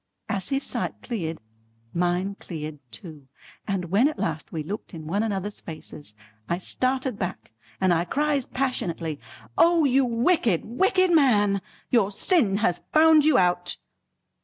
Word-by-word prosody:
As 200 -4 -3
his 275 0 0
sight - - -2
cleared, 165 -9 -4 0.5
mine 180 +3 0
cleared 155 -3 -6
too, 145 - -7 0.4
and 185 -4 -2
when 220 +8 +5
at 305 - -3
last 155 -2 -3
we 160 -2 -3
looked 195 +2 -6
in 160 -1 -8
one 195 +7 0
another's 205 -2 -3
faces, 155 - -10 0.3
I 170 - +1
started 255 +4 0
back, 180 - -5 0.3
and 185 -2 +3
I 170 +1 +1
cries 285 - 0
passionately: 170 - -2 0.4
"O 335 -2 +5
you 270 0 +4
wicked 235 - +2
wicked 370 - +2
man! 205 - +4 0.3
Your 230 -6 +4
sin 210 - +1
has 175 -1 0
found 315 -1 +6
you 310 -4 +5
out!" 180 -1 +2
200 Hz, 145 wpm, -25 LUFS, 175-265 Hz, 0.5 s, found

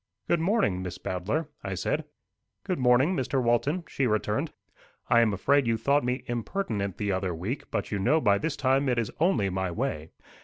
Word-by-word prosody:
"Good 170 - +2
morning, 165 - +1
Miss 90 -1 -5
Bowdler," 105 - -2 0.2
I 95 -1 -3
said. 145 - -1 0.6
"Good 185 -5 -2
morning, 130 +8 +4
Mr. 135 -2 0
Walton," 130 +8 +1
she 135 - 0
returned 110 -2 0 0.6
"I 120 - +7
am 115 -2 +3
afraid 135 +7 +2
you 115 -1 +2
thought 140 +6 +2
me 125 +1 -1
impertinent 115 - -3
the 105 -1 -1
other 95 -2 -1
week; 100 - -4
but - - -3
you 100 - -1
know 130 +11 +3
by 100 -8 +3
this 155 -2 -2
time 135 0 +2
it 125 - +1
is 115 -3 -1
only 125 - +2
my 95 0 -1
way." 85 - -3
120 Hz, 190 wpm, -27 LUFS, 100-145 Hz, 0.6 s, I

